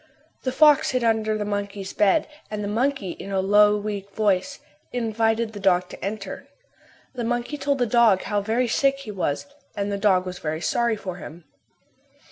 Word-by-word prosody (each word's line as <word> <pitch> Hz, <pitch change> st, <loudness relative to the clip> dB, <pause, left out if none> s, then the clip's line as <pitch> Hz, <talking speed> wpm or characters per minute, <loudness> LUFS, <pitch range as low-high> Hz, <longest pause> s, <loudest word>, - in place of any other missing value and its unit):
The 255 Hz, -, -1 dB
fox 300 Hz, +2 st, +5 dB
hid 255 Hz, -2 st, 0 dB
under 220 Hz, -1 st, +1 dB
the 210 Hz, -, -3 dB
monkey's 200 Hz, -1 st, -4 dB
bed 210 Hz, +9 st, +3 dB, 0.2 s
and 210 Hz, -1 st, -4 dB
the -, -, -2 dB
monkey, 230 Hz, -2 st, -1 dB
in 195 Hz, -, -8 dB
a 195 Hz, -, +1 dB
low, 205 Hz, +2 st, +5 dB
weak 205 Hz, -1 st, -5 dB
voice, 215 Hz, +6 st, +1 dB, 0.3 s
invited 225 Hz, -1 st, 0 dB
the 205 Hz, -, -7 dB
dog 180 Hz, -2 st, +2 dB
to -, -, -10 dB
enter. 200 Hz, 0 st, -5 dB, 0.7 s
The 245 Hz, -2 st, -4 dB
monkey 240 Hz, +4 st, -2 dB
told 280 Hz, -1 st, 0 dB
the 245 Hz, -, +2 dB
dog 225 Hz, -4 st, +4 dB
how 205 Hz, -1 st, -1 dB
very 230 Hz, +4 st, 0 dB
sick 275 Hz, +4 st, +2 dB
he 220 Hz, -, -7 dB
was 180 Hz, -, -2 dB, 0.3 s
and 200 Hz, 0 st, -2 dB
the 200 Hz, -, -2 dB
dog 190 Hz, -3 st, +3 dB
was 180 Hz, -1 st, -6 dB
very 155 Hz, 0 st, -3 dB
sorry 235 Hz, +5 st, +1 dB
for 185 Hz, -4 st, -6 dB
him. 170 Hz, -1 st, -10 dB
210 Hz, 185 wpm, -24 LUFS, 195-235 Hz, 0.7 s, fox